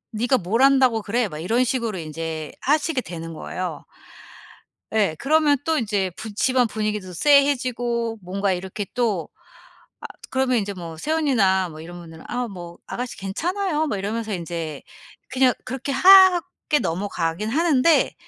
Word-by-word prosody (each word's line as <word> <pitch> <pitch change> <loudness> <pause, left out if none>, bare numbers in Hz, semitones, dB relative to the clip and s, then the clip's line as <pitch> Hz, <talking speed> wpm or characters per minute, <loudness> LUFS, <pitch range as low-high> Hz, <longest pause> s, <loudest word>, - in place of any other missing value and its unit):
"네가 245 +4 +2
뭘 210 +6 -1
안다고 265 -4 +4
그래?" 225 +3 0
막 155 -5 -8
이런 225 +10 +1
식으로 235 -5 -2
인제 160 -1 -5
하시게 295 0 +1
되는 165 -5 -7
거예요. 180 +3 -5 1.1
예 205 -8 +1
그러면 300 0 +3
또 320 -1 +1
인제 205 -5 -1
부 220 -1 -7
집안 250 +3 +2
분위기도 210 -4 -3
쎄해지고 245 - +2
뭔가 195 +2 -1
이렇게 190 +3 -4
또 220 -9 0 0.7
아 - - -14 0.2
그러면 260 -2 +1
인제 200 -1 -3
뭐 165 -3 -8
새언니나 215 - +1
뭐 155 0 -10
이런 175 +2 -9
분들은 165 -2 -12
아 245 0 -2
뭐 175 -4 -9
"아가씨 250 0 -5
괜찮아요." 315 - -2
뭐 265 - -2
이러면서 215 +3 -3
인제 165 -4 -5 0.5
그냥 260 -1 +3
그렇게 265 +2 -5
화 375 +6 +8
하게 345 -4 -2
넘어가기는 175 +2 -2
하는데 310 -1 +3
225 Hz, 320 characters per minute, -23 LUFS, 180-265 Hz, 1.1 s, 화